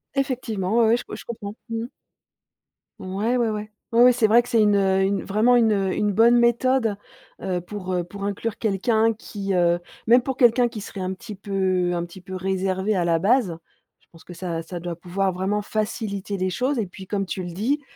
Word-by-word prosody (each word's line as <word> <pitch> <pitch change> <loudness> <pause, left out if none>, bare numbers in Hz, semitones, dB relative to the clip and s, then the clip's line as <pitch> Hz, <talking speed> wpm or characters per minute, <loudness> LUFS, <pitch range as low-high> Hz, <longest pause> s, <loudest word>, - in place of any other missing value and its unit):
Effectivement, 235 -7 -1
ouais, 225 +1 +4
je 245 - -6
co - - -8
je - - -11
comprends. 210 -3 -6
Mmh 225 0 -2
mh. - - -8 1.1
Ouais, 205 +6 -1
ouais, 235 -2 +1
ouais. 210 0 -4 0.2
Ouais, 240 +2 +7
c'est 235 -2 +2
vrai 230 +3 +6
que 245 - -11
c'est 230 -3 +3
une, 210 -1 +4
heu, 190 -1 +3
une 195 0 0
vraiment 220 +5 +3
une, 230 -2 +4
heu, 195 -2 +1
une 210 -1 0
bonne 230 +4 +5
méthode, 235 -1 +2 0.5
heu, 180 -2 -2
pour, 185 0 -6
heu, 180 -1 0
pour 195 +3 -9
inclure 205 +2 -3
quelqu'un 220 +2 +1
qui, 200 -3 -5
heu, 175 -1 +3 0.3
même 240 +2 +6
pour 265 0 -2
quelqu'un 240 -1 +5
qui 230 -3 -7
serait 200 - -8
un 185 0 -2
petit 210 +2 -9
peu 190 -2 0
un 170 -1 -1
petit 175 +2 -13
peu 185 +1 -8
réservé 190 +2 -1
à 180 - +1
la 165 -1 +2
base. 200 -3 +2 0.4
Je - - -34
pense 165 - -17
que 180 - -11
ça 170 -2 -4
ça 175 +2 -7
doit 170 0 -5
pouvoir 185 +3 -1
vraiment 190 +3 -1
faciliter 210 -2 -3
les 185 0 0
choses 255 +8 0
et 220 - 0
puis 190 +1 -11
comme 195 -1 -1
tu 185 0 -4
le 175 - -6
dis, 240 - -1
200 Hz, 215 wpm, -23 LUFS, 185-230 Hz, 1.1 s, Ouais